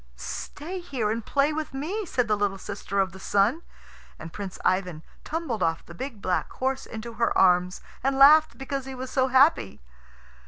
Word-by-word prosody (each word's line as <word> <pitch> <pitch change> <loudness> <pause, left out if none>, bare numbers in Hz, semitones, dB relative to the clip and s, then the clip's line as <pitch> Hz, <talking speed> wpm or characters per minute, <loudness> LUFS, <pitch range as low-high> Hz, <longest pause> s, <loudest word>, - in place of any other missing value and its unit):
"Stay 320 - -6
here 260 -11 -2
and 230 0 -4
play 285 +2 +2
with 310 -3 -4
me," 365 +9 -3
said 250 -6 0
the 215 - +2
little 205 -1 -1
sister 200 0 -4
of 190 -2 +1
the 190 - -12
Sun; 205 - +1 0.6
and 165 - -9
Prince 195 -3 -6
Ivan 180 -4 0 0.2
tumbled 305 - -3
off 165 -1 0
the 170 - -11
big 225 +2 -7
black 180 -1 -1
horse 265 +1 -2
into 230 +1 -7
her 235 +1 0
arms, 180 0 +3 0.2
and 270 0 +1
laughed 305 +3 +7
because 270 0 -4
he 265 - -6
was 255 0 -6
so 260 -1 +2
happy. 265 - +3
240 Hz, 185 wpm, -26 LUFS, 195-275 Hz, 0.6 s, laughed